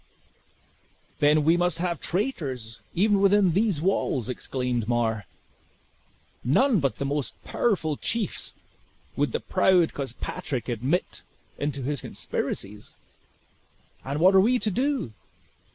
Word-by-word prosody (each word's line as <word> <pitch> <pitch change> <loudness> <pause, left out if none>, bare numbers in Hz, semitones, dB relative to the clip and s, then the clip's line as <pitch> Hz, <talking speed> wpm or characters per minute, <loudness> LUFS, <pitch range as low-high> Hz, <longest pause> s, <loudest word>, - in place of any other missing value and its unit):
"Then 150 +1 +4
we 165 +3 +4
must 175 -2 +1
have 170 -2 -1
traitors, 135 - -3 0.2
even 200 +2 +3
within 200 -2 +5
these 190 -4 +1
walls," 140 - 0
exclaimed 125 -3 -2
Mar; 115 -3 0 1.2
"none 215 - +3
but 135 -3 0
the 140 - -3
most 140 0 -2
powerful 165 -9 0
chiefs 230 -2 -2 0.6
would - - +1
the - - -1
proud 180 -3 +3
Cospatrick 130 -1 -4
admit 125 +10 -1 0.4
into 140 -2 -2
his 145 +1 -2
conspiracies. 105 +1 -5 1.1
And 140 +3 -3
what 185 +4 +6
are 190 - +7
we 245 +5 +3
to 215 -2 -1
do? 255 - -1
155 Hz, 120 wpm, -26 LUFS, 130-195 Hz, 1.2 s, are